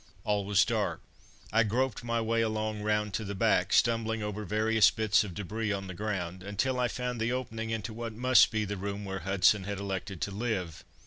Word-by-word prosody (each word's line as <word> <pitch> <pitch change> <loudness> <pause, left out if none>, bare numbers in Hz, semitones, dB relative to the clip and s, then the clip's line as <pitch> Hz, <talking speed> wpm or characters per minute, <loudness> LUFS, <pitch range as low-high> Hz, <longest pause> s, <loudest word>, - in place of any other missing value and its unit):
All 105 -1 0
was 100 -1 +4
dark. - - -1 0.5
I 115 - +5
groped 120 +2 0
my 115 0 0
way 115 +1 +1
along 110 -1 -1
round 105 -1 0
to 110 - -2
the 100 -1 -5
back, - - +2
stumbling 115 -2 +2
over 105 0 -4
various 110 +1 +4
bits 110 -2 +2
of 95 -5 -7
debris 105 +2 -3
on 100 -1 -2
the 95 - -6
ground, 95 -3 -3
until 105 +7 -1
I 125 - +2
found 125 -1 -3
the 115 +2 +1
opening 115 -3 -3
into 110 0 -3
what 115 0 -5
must 125 +1 +5
be 110 -1 -1
the 100 0 -4
room 100 +1 -4
where 95 0 -4
Hudson 95 +2 +3
had 100 0 -3
elected 95 -1 -4
to 100 - -2
live. 100 -6 -3
105 Hz, 205 wpm, -30 LUFS, 100-115 Hz, 0.5 s, I